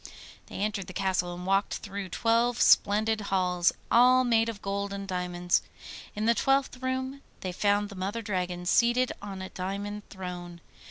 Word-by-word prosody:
They -, -, -11 dB
entered 200 Hz, -2 st, -2 dB
the 185 Hz, -, -8 dB
castle 185 Hz, -1 st, 0 dB
and 180 Hz, +1 st, -8 dB
walked 195 Hz, +2 st, +1 dB
through 200 Hz, -2 st, -6 dB
twelve 235 Hz, +4 st, +1 dB
splendid 215 Hz, +2 st, +4 dB
halls, 180 Hz, -2 st, +2 dB, 0.2 s
all 255 Hz, +2 st, +6 dB
made 230 Hz, -2 st, +2 dB
of 220 Hz, -3 st, -6 dB
gold 200 Hz, 0 st, -3 dB
and 200 Hz, 0 st, -5 dB
diamonds. 180 Hz, -1 st, 0 dB, 0.5 s
In 210 Hz, +1 st, -2 dB
the 230 Hz, -, +5 dB
twelfth 270 Hz, 0 st, +1 dB
room 260 Hz, +1 st, -3 dB, 0.2 s
they 185 Hz, -, -3 dB
found 205 Hz, +2 st, +1 dB
the 200 Hz, -, -10 dB
Mother 200 Hz, +5 st, -3 dB
Dragon 180 Hz, -3 st, -3 dB
seated 240 Hz, +6 st, +3 dB
on 195 Hz, -2 st, -6 dB
a 190 Hz, -, -6 dB
diamond 200 Hz, +3 st, -4 dB
throne. 180 Hz, -3 st, -7 dB
200 Hz, 165 wpm, -28 LUFS, 185-230 Hz, 0.5 s, all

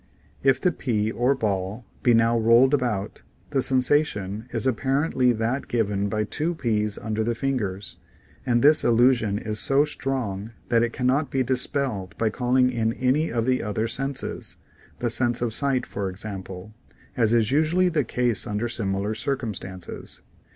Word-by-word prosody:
If 135 Hz, -1 st, +3 dB
the 180 Hz, -, +2 dB
pea 110 Hz, -8 st, -1 dB
or 125 Hz, +4 st, +1 dB
ball 105 Hz, -1 st, -3 dB, 0.2 s
be 120 Hz, -2 st, +4 dB
now 115 Hz, +1 st, +3 dB
rolled 115 Hz, +4 st, +4 dB
about, 115 Hz, -7 st, -1 dB, 0.3 s
the 135 Hz, -2 st, +1 dB
sensation 125 Hz, -6 st, +2 dB
is 115 Hz, -3 st, -2 dB
apparently 135 Hz, +1 st, +1 dB
that 120 Hz, +4 st, -2 dB
given 100 Hz, -4 st, -1 dB
by 110 Hz, +1 st, -1 dB
two 160 Hz, +10 st, -2 dB
peas 105 Hz, -6 st, -1 dB
under 110 Hz, 0 st, -2 dB
the 115 Hz, +1 st, -1 dB
fingers, 105 Hz, -7 st, -3 dB, 0.5 s
and 120 Hz, -3 st, +1 dB
this 150 Hz, +2 st, +6 dB
illusion 120 Hz, -3 st, +3 dB
is 105 Hz, 0 st, -3 dB
so 140 Hz, +2 st, +3 dB
strong 115 Hz, -8 st, -3 dB, 0.2 s
that 115 Hz, -1 st, +3 dB
it 120 Hz, 0 st, 0 dB
can 125 Hz, -, -4 dB
not 140 Hz, +4 st, +2 dB
be 135 Hz, -1 st, 0 dB
dispelled 125 Hz, -6 st, -2 dB
by 110 Hz, -1 st, 0 dB
calling 125 Hz, +2 st, +2 dB
in 115 Hz, -2 st, 0 dB
any 130 Hz, +6 st, 0 dB
of 115 Hz, -1 st, -1 dB
the 130 Hz, 0 st, +1 dB
other 110 Hz, +1 st, -2 dB
senses 125 Hz, -6 st, -3 dB, 0.4 s
(the 120 Hz, -2 st, -1 dB
sense 120 Hz, 0 st, +2 dB
of 120 Hz, -2 st, -2 dB
sight 135 Hz, 0 st, +1 dB
for 100 Hz, -1 st, -4 dB
example) 95 Hz, 0 st, -8 dB, 0.4 s
as 115 Hz, -3 st, +2 dB
is 115 Hz, 0 st, +2 dB
usually 160 Hz, +5 st, +3 dB
the 155 Hz, -4 st, +1 dB
case 120 Hz, -2 st, 0 dB
under 105 Hz, +3 st, -2 dB
similar 100 Hz, -2 st, -2 dB
circumstances. 105 Hz, -8 st, -5 dB
120 Hz, 160 wpm, -24 LUFS, 105-130 Hz, 0.5 s, this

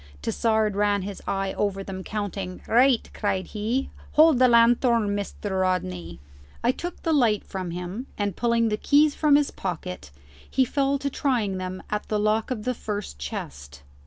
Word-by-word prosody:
Tassard 220 Hz, -, +1 dB
ran 205 Hz, -1 st, +1 dB
his 200 Hz, 0 st, -6 dB
eye 195 Hz, -1 st, -1 dB
over 195 Hz, -1 st, -1 dB
them, 190 Hz, -1 st, -6 dB
counting. 200 Hz, -3 st, -4 dB
"Right!" 250 Hz, +1 st, +4 dB
cried 195 Hz, -3 st, -1 dB
he; 230 Hz, +6 st, -2 dB, 0.2 s
"hold 310 Hz, -4 st, +6 dB
the 255 Hz, -, +6 dB
lanthorn, 235 Hz, -1 st, +4 dB
Mr. 200 Hz, -1 st, -3 dB
Rodney." 90 Hz, -, -2 dB, 0.4 s
I 240 Hz, -, +4 dB
took 350 Hz, +6 st, -7 dB
the 325 Hz, -, +1 dB
light 235 Hz, -8 st, +3 dB
from 185 Hz, -2 st, -5 dB
him, 180 Hz, +9 st, -5 dB
and, 205 Hz, -3 st, -1 dB
pulling 235 Hz, -1 st, +2 dB
the 210 Hz, -, 0 dB
keys 290 Hz, +4 st, +4 dB
from 300 Hz, -1 st, +4 dB
his 290 Hz, -1 st, +2 dB
pocket, 90 Hz, -, -5 dB, 0.4 s
he 260 Hz, -, +2 dB
fell 275 Hz, +2 st, +1 dB
to 280 Hz, 0 st, -3 dB
trying 225 Hz, -10 st, 0 dB
them 185 Hz, 0 st, -5 dB
at 210 Hz, 0 st, -2 dB
the 215 Hz, -, 0 dB
lock 215 Hz, +1 st, +1 dB
of 235 Hz, -5 st, -3 dB
the 255 Hz, -, 0 dB
first 210 Hz, -, -5 dB
chest. 70 Hz, 0 st, -7 dB
210 Hz, 170 wpm, -25 LUFS, 190-245 Hz, 0.4 s, hold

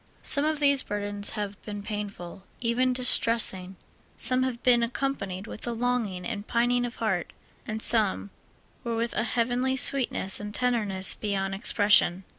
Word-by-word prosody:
Some 285 Hz, +1 st, +2 dB
of 310 Hz, -1 st, -1 dB
these 280 Hz, -2 st, +4 dB
burdens 205 Hz, 0 st, -3 dB
have 205 Hz, -1 st, -6 dB
been 205 Hz, -1 st, -8 dB
painful, 200 Hz, -4 st, -7 dB, 0.2 s
even 245 Hz, +2 st, 0 dB
distressing; 230 Hz, -6 st, +3 dB, 0.4 s
some 255 Hz, -1 st, +1 dB
have 255 Hz, -2 st, -3 dB
been 245 Hz, -2 st, +3 dB
accompanied 230 Hz, -6 st, -4 dB
with 225 Hz, -, -9 dB
a 240 Hz, -, -2 dB
longing 230 Hz, -6 st, -2 dB
and 215 Hz, -3 st, -6 dB
pining 245 Hz, +1 st, 0 dB
of 240 Hz, -, -10 dB
heart, -, -, -3 dB, 0.3 s
and 220 Hz, -1 st, -4 dB
some 195 Hz, -, +2 dB, 0.5 s
were 235 Hz, -1 st, -3 dB
with 230 Hz, +1 st, -3 dB
a -, -, -1 dB
heavenly 245 Hz, +3 st, -1 dB
sweetness 250 Hz, -7 st, +2 dB
and 210 Hz, +1 st, -4 dB
tenderness 210 Hz, -7 st, +2 dB
beyond 195 Hz, -2 st, -3 dB
expression. 195 Hz, -2 st, +3 dB
230 Hz, 150 wpm, -26 LUFS, 205-245 Hz, 0.5 s, these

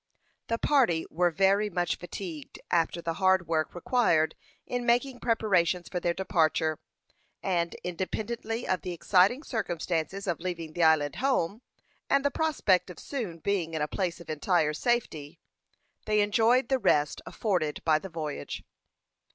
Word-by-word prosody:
The 230 Hz, -, 0 dB
party 235 Hz, -, +2 dB
were 175 Hz, +2 st, +2 dB
very 195 Hz, +5 st, +2 dB
much 175 Hz, -2 st, -1 dB
fatigued 175 Hz, -4 st, -7 dB
after 170 Hz, 0 st, +1 dB
the 165 Hz, -, -1 dB
hard 185 Hz, -2 st, +4 dB
work 160 Hz, 0 st, -1 dB
required 175 Hz, -5 st, +2 dB, 0.3 s
in 245 Hz, 0 st, -3 dB
making 245 Hz, +2 st, +1 dB
preparations 185 Hz, -6 st, +1 dB
for 180 Hz, -, -2 dB
their 175 Hz, -, 0 dB
departure, 160 Hz, -4 st, +1 dB, 0.6 s
and 170 Hz, -3 st, 0 dB
independently 220 Hz, +6 st, -3 dB
of 185 Hz, -, 0 dB
the 180 Hz, -, -4 dB
exciting 195 Hz, -, +3 dB
circumstances 180 Hz, -, -2 dB
of 175 Hz, -4 st, -1 dB
leaving 170 Hz, -3 st, -5 dB
the 175 Hz, -, -2 dB
island 155 Hz, -3 st, +3 dB
home, 235 Hz, -6 st, 0 dB, 0.5 s
and 275 Hz, 0 st, +3 dB
the 285 Hz, -, +3 dB
prospect 210 Hz, -, +1 dB
of 180 Hz, -, -9 dB
soon 225 Hz, -12 st, -5 dB
being 170 Hz, -2 st, -1 dB
in 155 Hz, -, -2 dB
a -, -, 0 dB
place 175 Hz, +1 st, -2 dB
of 170 Hz, -, -12 dB
entire 155 Hz, 0 st, +1 dB
safety, 160 Hz, -7 st, -2 dB, 0.7 s
they 210 Hz, -1 st, +3 dB
enjoyed 230 Hz, +5 st, +3 dB
the 265 Hz, -1 st, +2 dB
rest 150 Hz, -, +2 dB
afforded 180 Hz, -9 st, -1 dB
by 155 Hz, -1 st, +4 dB
the 190 Hz, -, -8 dB
voyage. 155 Hz, -3 st, -5 dB
180 Hz, 150 wpm, -28 LUFS, 165-220 Hz, 0.7 s, hard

